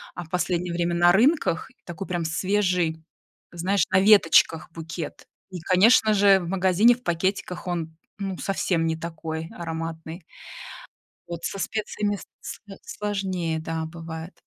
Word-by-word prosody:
а 175 - -5
в 160 - -20
последнее 175 0 -1
время 170 0 0
на 175 0 +5
рынках. 245 - +2
И - - -30
такой 185 +2 -6
прям 175 -2 -2
свежий, 180 -2 0 0.5
знаешь, 180 +2 +1
на 190 - +4
веточках 190 -6 +5
букет, 165 0 -7 0.2
и, 180 -2 -7
конечно 215 +5 +5
же, 200 -1 +5
в 175 - -6
магазине 190 +5 +4
в 250 - -20
пакетиках 180 +1 -2
он, 165 -2 -4 0.2
ну, 195 -2 -3
совсем 180 -4 0
не 160 0 0
такой 160 0 -6
ароматный. 165 0 -6 1.1
Вот 170 -1 -6
со 195 - -4
специями 205 0 -2 0.2
сло 200 -2 -9
сложнее, 190 -6 -3
да, 160 0 -3
бывает. 165 +1 -8
175 Hz, 140 wpm, -25 LUFS, 165-195 Hz, 1.1 s, на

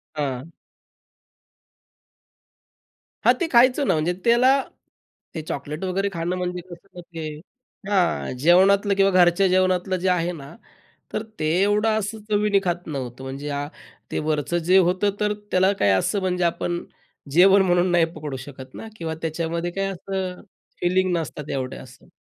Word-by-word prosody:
हां. 140 0 -3 2.7
हां, - - +7
ते 345 - +1
खायचं 255 +3 +5
ना - - +4
म्हणजे 160 +3 0
त्याला 240 +2 +5 0.8
ते 160 - -3
चॉकलेट 150 +4 -5
वगैरे 195 +2 0
खाणं 170 +1 -2
म्हणजे 180 0 -3
कसं 175 +3 -12
न - - -5
ते 165 -1 -5 0.6
हां, 190 -9 +1
जेवणातलं 195 +4 +5
किंवा 195 0 +4
घरच्या 180 +1 +4
जेवणातलं 185 0 +1
जे - - +3
आहे 180 -1 +1
ना, 145 -1 -10 0.6
तर 215 - -2 0.2
ते 155 - -1 0.2
एवढं 205 +2 +2
असं 220 +2 -5
चवीने 205 -1 +2
खात 175 -1 -2
नव्हतो. 130 -3 -6
म्हणजे 140 +2 -5 0.6
ते - - -1
वरचं 155 +2 0
जे 185 - +7
होतं, 185 +2 +3
तर 210 0 +1 0.2
त्याला 185 +1 +4
काय 100 - +4
असं, 200 - 0
म्हणजे 180 -1 0
आपण 175 0 -1 0.5
जेवण 190 +5 +6
म्हणून 180 -1 +2
नाही 175 -1 +4
पकडू 150 -3 -5
शकत 130 -2 -11
ना 225 - -8
किंवा 160 -3 -4
त्याच्यामध्ये 165 +2 -2
काय 195 +2 -2
असं 190 0 -5 0.4
फीलिंग 185 +1 +2
नसतात 150 -2 -6
एवढं 130 -1 -4
असं. 125 -1 -17
180 Hz, 150 wpm, -23 LUFS, 160-195 Hz, 2.7 s, हां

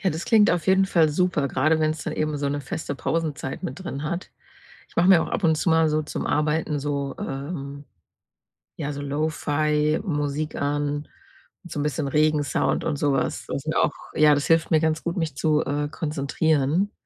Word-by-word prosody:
Ja, 190 - +1
das 160 +4 -4
klingt 215 -3 +5
auf 175 -3 -1
jeden 190 +1 +5
Fall 165 -5 +3
super, 155 -3 +1
grade 155 +5 +2
wenn's 155 0 0
dann - - -3
eben 155 -1 -1
so 140 0 -1
'ne 145 0 -2
feste 140 +1 -5
Pausenzeit 150 -3 -3
mit 150 +9 -5
drin 145 -5 -5
hat. 170 +4 -4 0.6
Ich - - -25
mache 175 +2 +4
mir 175 -4 +7
auch - - -5
ab 200 - -2
und 160 -1 +4
zu 165 - +1
mal 160 0 +4
so 155 0 +1
zum 150 - -4
Arbeiten 150 0 0
so, 140 -1 -3
ähm, 140 0 -5 0.9
ja, 145 -1 -4
so 145 - -6
Lo-Fi-Musik 150 +1 -1
an 145 +1 -1 0.6
und 175 - -12
so 145 - -3
'n - - 0
bisschen 150 -1 -1
Regensound 150 -1 +1
und 150 -3 -1
so 145 -1 +1
was. 135 - -1
Das - - -4
sind - - -3
auch - - +3 0.2
ja, 150 -1 +6
das 140 - -1
hilft 165 -1 +3
mir 160 - +5
ganz 160 0 0
gut, 170 +2 -3
mich 155 -5 -2
zu, 155 0 +2
äh, 145 +1 -1
konzentrieren. 155 +4 0
150 Hz, 195 wpm, -24 LUFS, 145-160 Hz, 0.9 s, mir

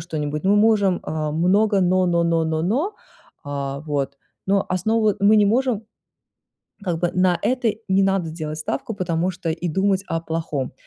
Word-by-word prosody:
что-нибудь. 150 -1 -4
Мы 195 +2 +4
можем, 205 -4 +3
а, 155 -1 -3
много 195 +5 +2
"но", 185 0 +2
"но", 170 -1 +2
"но", 165 -1 +1
"но", 160 0 -1
"но". 275 - 0 0.5
А, 140 -1 -4
вот. 140 -2 -3 0.3
Но 195 0 +2
основу 215 +3 +1
мы 205 +2 +5
не 210 -1 +5
можем 240 0 +1 1.0
Как 175 -4 -1
бы 175 0 +1
на 180 -1 +3
это 250 -2 +1 0.2
не 190 +1 +3
надо 195 -4 +1
делать 155 -1 -5
ставку, 190 +7 -3
потому 180 -2 -1
что 180 -2 -6
и 170 +2 -3
думать 190 +3 +1
о 165 - -1
плохом. 160 -5 -3
180 Hz, 170 wpm, -22 LUFS, 160-200 Hz, 1.0 s, мы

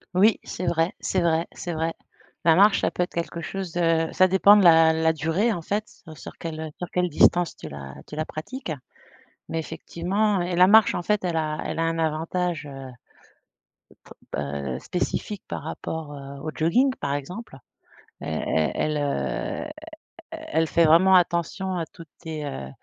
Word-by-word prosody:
Oui 210 +3 +5
c'est 180 - -5
vrai, 170 +2 +1
c'est 185 - 0
vrai, 165 0 +2
c'est 175 - -5
vrai, 160 +1 -1 0.5
la 165 -1 +5
marche 200 +2 +5
ça - - +2
peut 180 - -1
être - - -6
quelque 170 0 -4
chose 190 0 -5
de 165 -2 +2
ça 185 0 +4
dépend 200 +2 +6
de 200 - +4
la 165 -1 +7
la 160 0 +2
durée 165 +9 0
en 170 - -4
fait 205 +6 -1 0.3
sur - - -10
quelle, 160 -1 -5
heu, 160 -1 -4
sur 180 - -5
quelle 180 -1 0
distance 175 0 +3
tu 80 - -9
la 70 -2 -8
tu 150 - -9
la 155 - -2
pratique 170 - -6 0.8
mais 165 - -2
effectivement 185 +6 -1
et 175 0 -2
la 180 +1 +6
marche 220 +1 +6
en - - -1
fait 210 -1 0
elle 175 -2 -1
a 155 -1 -1
elle - - -4
a - - +1
un 165 0 -1
avantage 160 0 -1
heu 135 -1 -8 1.4
bah, 70 +1 -3
heu, 65 -2 -4
spécifique 190 +2 -3
par - - -5
rapport, 160 -1 -5
heu, 140 0 -9
au 155 0 -4
jogging 245 - +3
par 140 - -2
exemple. 160 +2 -7 0.6
Elle 80 -1 -3 0.3
elle 155 0 -1
elle, - - 0 0.7
heu, - - -8 0.6
elle 315 - -1
fait 170 - +3
vraiment 170 +5 +6
attention 180 +1 +1
à 165 -2 -2
toutes 165 0 -14
tes 155 -2 -6
heu, 65 - -5
165 Hz, 185 wpm, -25 LUFS, 155-185 Hz, 1.4 s, la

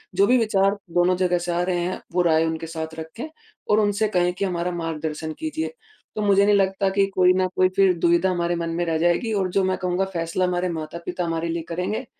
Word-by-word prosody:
जो 200 +2 +4
भी 250 +3 +5
विचार 200 -3 +2 0.2
दोनों 175 +1 +3
जगह 180 -1 +2
से 175 0 -3
आ 170 - 0
रहे 180 -1 0
हैं 185 - -4
वो 180 - +3
राय 160 -1 +3
उनके 160 0 -3
साथ 160 -1 -5
रखें 160 - -7 0.4
और 210 - +4
उनसे 205 0 +1
कहें 180 -3 +1
कि 195 +2 -2
हमारा 180 -1 -2
मार्गदर्शन 160 -2 -4
कीजिए। 315 +5 -3 0.4
तो 215 - -2
मुझे 200 -1 +4
नहीं 205 0 +4
लगता 195 0 +1
कि 200 -1 +4
कोई 180 0 +5
ना 185 0 +1
कोई 185 0 +4
फिर 195 -2 +4
दुविधा 170 +2 +3
हमारे 175 -1 0
मन 170 -1 -3
में 175 - 0
रह 165 -1 0
जाएगी 175 +7 +1
और 195 -3 0
जो 195 - +2
मैं 185 0 0
कहूँगा 180 +1 -1
फ़ैसला 165 +2 -1
हमारे 180 0 -1
माता-पिता 170 +2 -5
हमारे 165 0 -2
लिए 165 0 -2
करेंगे, 180 +5 -3
180 Hz, 225 wpm, -23 LUFS, 170-195 Hz, 0.4 s, भी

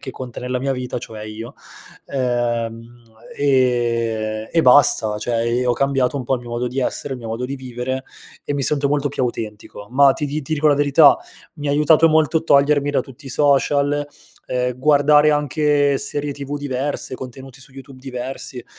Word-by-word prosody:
che 130 - -6
conta 125 -2 -8
nella 125 0 -2
mia 135 +1 -1
vita, 125 -1 -4
cioè 110 -2 -9
io. 110 +2 -8 0.5
Ehm, 120 -2 -3 0.3
e 115 -5 0
e 165 - +3
basta 125 -5 +4
cioè 115 +2 -2
e 120 +2 0
ho 120 - +3
cambiato 135 +1 0
un 130 - -4
po' 135 - +1
il 125 - -4
mio 120 - -11
modo 120 +1 -2
di 130 +2 -3
essere, 135 +2 -2
il 130 - -8
mio 115 - -7
modo 115 +3 -3
di 135 +2 -4
vivere 130 0 -5 0.4
e - - -3
mi 140 - -2
sento 140 +1 +2
molto 145 0 0
più 135 -1 -3
autentico, 105 -3 -5
ma 135 +1 +5
ti 150 - -3
di 150 +1 -4
ti 155 +3 -2
dico 155 +1 0
la 145 - +5
verità, 145 +1 +5 0.4
mi 145 -2 -5
ha - - +1
aiutato 150 +2 +4
molto 160 0 +3
a - - -8
togliermi 145 -1 +3
da 145 - +1
tutti 135 +1 -15
i - - -6
social, 145 +1 +2 0.4
ehm, 125 -1 -2
guardare 150 +1 +4
anche 145 -1 +1
serie 145 +1 -3
TV 140 +1 -6
diverse, 140 -1 -3
contenuti 130 +1 -10
su 130 - -11
YouTube 135 -1 -13
diversi 130 -1 -6
135 Hz, 190 wpm, -20 LUFS, 120-145 Hz, 0.5 s, ma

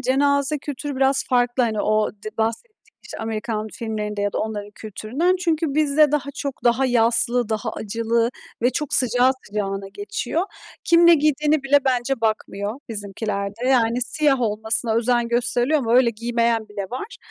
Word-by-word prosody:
cenaze 280 +3 +1
kültürü 290 0 -6
biraz 270 0 +2
farklı. 245 0 +2
Hani, 220 -3 0
o 215 0 +1
d 215 +1 -10
bahsettiğim, 230 - -2 0.3
işte, - - -9
Amerikan 220 -1 -3
filmlerinde 210 -2 -4
ya 205 - -1
da - - -2
onların 210 -1 -4
kültüründen. 245 - -2
Çünkü 325 -5 -1
bizde 300 0 +3
daha 285 -1 -1
çok 280 -3 -6
daha 245 +2 +3
yaslı, 235 0 +3
daha 220 +1 -2
acılı 230 +2 -1 0.3
ve 245 - +3
çok 300 +1 -1
sıcağı 250 0 +4
sıcağına 195 -1 -4
geçiyor. 380 - -3 0.4
Kim 340 0 +5
ne 340 - +8
giydiğine 300 0 +1
bile 280 +1 +4
bence 255 -1 0
bakmıyor 215 -2 -2
bizimkilerde. 205 +2 -3
Yani, 240 -2 +2
siyah 285 0 +1
olmasına 220 0 +2
özen 240 0 +1
gösteriliyor 245 +4 +1
ama 235 -4 0
öyle 250 -2 +4
giymeyen 230 0 -1
bile 205 -1 -5
var. 330 - -6
240 Hz, 155 wpm, -22 LUFS, 220-275 Hz, 0.4 s, ne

